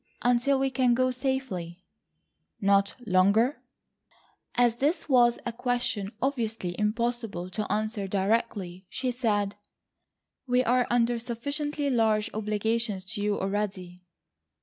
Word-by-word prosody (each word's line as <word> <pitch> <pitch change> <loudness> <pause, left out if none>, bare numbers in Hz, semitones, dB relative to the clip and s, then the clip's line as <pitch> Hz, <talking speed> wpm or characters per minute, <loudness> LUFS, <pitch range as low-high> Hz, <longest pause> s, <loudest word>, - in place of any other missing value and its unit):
"Until 245 +3 +3
we 270 0 0
can 255 -2 +3
go 255 +1 +2
safely." 250 -10 -2 0.8
"Not 200 -1 +3
longer?" 200 +9 +3 0.9
As 240 -2 +3
this 310 +5 0
was 240 -4 +5
a 240 - -2
question 235 -5 -1
obviously 225 -9 -2
impossible 215 -4 -1
to 215 +2 -3
answer 215 -1 -1
directly 195 -2 -1
she 255 +3 -2
said, 205 -5 0 0.9
"We 250 0 +3
are 250 +1 +2
under 240 0 +2
sufficiently 285 +5 -2
large 220 -2 +2
obligations 215 -1 -1
to 205 - -3
you 205 0 0
already." 190 -3 -3
230 Hz, 115 wpm, -28 LUFS, 200-250 Hz, 0.9 s, was